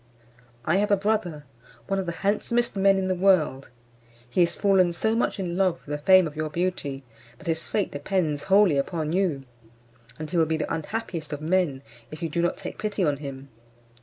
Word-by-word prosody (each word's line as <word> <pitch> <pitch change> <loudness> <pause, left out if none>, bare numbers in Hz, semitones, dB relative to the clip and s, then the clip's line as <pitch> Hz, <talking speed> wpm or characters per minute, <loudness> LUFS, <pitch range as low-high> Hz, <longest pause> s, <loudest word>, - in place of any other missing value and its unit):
I 165 +4 +2
have 205 +2 +1
a 200 - +4
brother, 190 -7 -1 0.4
one 195 -1 -1
of 190 - -3
the - - -1
handsomest 235 +4 +1
men 195 0 +4
in 190 -1 -1
the 185 - +1
world: 175 -8 +2 0.6
he 150 +9 +1
is 170 0 +2
fallen 190 -4 +3
so 220 +6 0
much 230 -3 0
in 175 -2 -3
love 185 -2 +2
with 150 - -3
the 145 - -8
fame 185 0 +7
of 155 -1 -6
your 155 0 -2
beauty, 150 -5 -3 0.3
that - - -16
his 165 -1 -2
fate 205 - -1
depends 150 0 -1
wholly 195 -6 +4
upon 155 +2 -2
you, 175 -8 0 0.7
and 155 - -5
he 170 - -3
will 160 -1 +3
be 160 0 0
the 155 - -3
unhappiest 165 -2 -4
of 145 - -5
men 160 -5 0 0.3
if 155 +2 -8
you 165 - -1
do 170 +3 -1
not 175 - 0
take - - -8
pity 210 -2 -1
on 145 -2 +1
him. 135 -1 -8
175 Hz, 205 wpm, -25 LUFS, 150-195 Hz, 0.7 s, fame